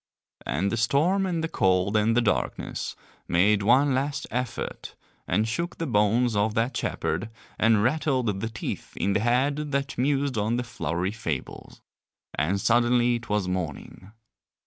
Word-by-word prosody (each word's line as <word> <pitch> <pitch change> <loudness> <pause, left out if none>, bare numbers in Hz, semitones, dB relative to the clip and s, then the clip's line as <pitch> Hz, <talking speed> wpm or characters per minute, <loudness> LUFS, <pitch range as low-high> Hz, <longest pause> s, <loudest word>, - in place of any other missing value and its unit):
And 90 +9 0
the 115 - -1
storm 155 - +2
and 170 -3 -1
the - - 0
cold 95 - +1
and 110 +2 +3
the - - +5
darkness 110 - -2 0.3
made 100 +4 +3
one 130 +7 +4
last 140 +2 -1
effort, 125 0 -4 0.3
and 110 +1 +1
shook 170 +10 -3
the 165 - -2
bones 115 0 +2
of 105 +2 +1
that 115 +4 0
shepherd, - - -2 0.3
and 110 -2 +4
rattled 130 -6 +1
the 115 - -2
teeth 110 -4 -6
in 100 - +1
the - - +2
head 125 +6 +2 0.2
that 140 -1 -2
mused 140 -2 +1
on 110 +3 0
the 125 - -1
flowery 90 -5 -2
fables, 80 - -6 0.5
and 90 +7 0
suddenly 120 +2 +3
it 115 - -12
was 105 -3 0
morning. 90 +1 -5
115 Hz, 155 wpm, -26 LUFS, 100-130 Hz, 0.5 s, the